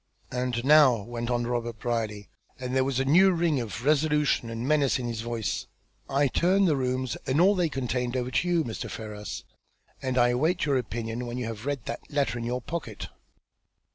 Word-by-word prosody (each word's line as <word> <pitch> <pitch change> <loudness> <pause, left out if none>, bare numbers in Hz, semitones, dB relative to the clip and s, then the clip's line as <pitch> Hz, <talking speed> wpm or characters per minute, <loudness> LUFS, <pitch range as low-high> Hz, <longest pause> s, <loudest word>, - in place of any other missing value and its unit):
"And 125 -1 -2
now," 140 -7 +6
went 120 +1 -5
on 120 -1 0
Robert 120 -2 -2
Brierly, 110 -3 -2 0.3
and 125 0 -3
there 130 - +4
was 135 -1 -1
a 135 - +1
new 180 +8 +6
ring 170 -5 +1
of 115 +1 -5
resolution 150 -4 +2
and 115 +2 -4
menace 145 -3 +3
in 125 - -4
his 115 -2 -3
voice. 115 -2 -3 0.4
"I 140 +1 +3
turn 185 +8 +3
the 160 -5 +3
rooms 130 -1 -1
and 135 +3 +2
all 190 +4 +6
they 180 -4 +1
contain 125 -2 -2
over 125 0 -2
to 175 - +1
you, 170 -2 +2
Mr. 115 -6 -5
Ferrars, 105 -2 -6 0.6
and 130 -1 -2
I 120 0 +5
await 155 +9 +1
your 140 -3 +2
opinion, 120 0 -4
when 120 +1 -4
you 125 - -2
have 115 +2 -6
read 140 -6 -2
that - - -6
letter 140 -4 0
in 115 - -4
your 125 +1 -2
pocket." 170 -2 -5
125 Hz, 200 wpm, -27 LUFS, 120-145 Hz, 0.6 s, now